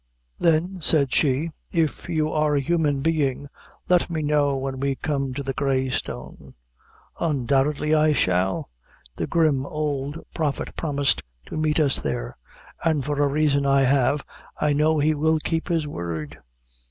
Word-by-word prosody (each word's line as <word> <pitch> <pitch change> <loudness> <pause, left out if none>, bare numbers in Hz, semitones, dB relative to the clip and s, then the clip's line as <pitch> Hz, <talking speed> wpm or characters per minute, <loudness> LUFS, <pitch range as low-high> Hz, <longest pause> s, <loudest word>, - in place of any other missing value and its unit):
"Then," 170 +3 +2
said 145 -5 +3
she, 150 +3 +2 0.2
"if 165 0 -1
you 155 -2 0
are 150 -1 +1
a - - +3
human 145 -1 +1
being, 145 -3 0 0.4
let 180 -1 +3
me 160 -2 -2
know 145 -2 +2
when 135 0 -4
we 135 0 0
come 135 0 -2
to 140 - -3
the 135 0 -3
Grey 135 -1 0
Stone." 130 - -6 0.6
"Undoubtedly, 145 0 +1
I 155 0 +4
shall. 95 - 0 0.5
The - - -2
grim 155 -6 +2
old 145 0 -3 0.2
Prophet 150 -4 -2
promised 145 -4 +1 0.2
to - - -8
meet 155 0 +1
us 145 -3 +3
there - - -3 0.5
and, 155 -5 +1
for 145 0 -1
a 145 - +4
reason 140 0 +2
I 140 0 +4
have, 135 +1 +2 0.4
I 150 -1 +2
know 155 +2 +2
he 150 +1 +3
will 160 +2 +2
keep 160 +1 -2
his 165 -3 0
word. 85 - -5
145 Hz, 155 wpm, -24 LUFS, 135-155 Hz, 0.6 s, I